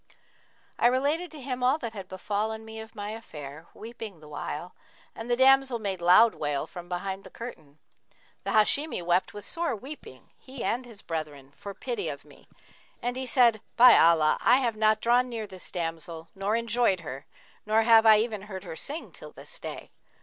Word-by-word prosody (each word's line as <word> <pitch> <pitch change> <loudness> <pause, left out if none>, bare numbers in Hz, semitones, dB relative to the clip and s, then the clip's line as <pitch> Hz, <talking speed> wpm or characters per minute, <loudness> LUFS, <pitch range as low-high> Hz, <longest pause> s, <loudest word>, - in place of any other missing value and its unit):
I - - +5
related 285 +8 +1
to 310 - -10
him 255 -1 -4
all 255 +4 +3
that 235 -7 -6
had 195 -3 -8
befallen 215 +4 -3
me 220 0 -8
of 220 0 -10
my 205 0 -5
affair, 155 -8 -9
weeping 220 -5 -9
the 155 - -14
while, 150 +3 -6 0.4
and 225 +2 -8
the 240 - +3
damsel 265 0 +5
made 195 -5 -4
loud 185 +7 +6
wail 145 -1 -2
from 175 +1 -10
behind 190 +2 -4
the - - -11
curtain. 155 -12 -10 0.7
The - - -4
Hashimi 220 - +2
wept 175 +3 +1
with 205 - -7
sore 335 -7 -2
weeping, 245 - -11
he 260 -1 -8
and 245 +2 -1
his 220 -3 -11
brethren, 150 -4 -5
for 200 -1 -8
pity 470 -4 -3
of - - -8
me, - - -19 0.5
and 245 +1 -3
he 260 0 -3
said, 235 -5 +4 0.2
'By 245 0 +9
Allah, 160 -2 +5
I 245 - +6
have 240 -4 0
not 215 0 +2
drawn 245 +2 +3
near 225 -3 -4
this 190 -3 -10
damsel 165 -1 -5
nor 195 +3 -1
enjoyed 230 -5 +1
her, 135 -3 -8 0.4
nor 220 +1 +3
have 225 -1 +6
I 215 -1 +9
even 215 -2 -1
heard 195 -2 -8
her 170 -4 -7
sing 295 - -5
till - - -12
this - - -10
day! - - -8
215 Hz, 190 wpm, -27 LUFS, 175-245 Hz, 0.7 s, By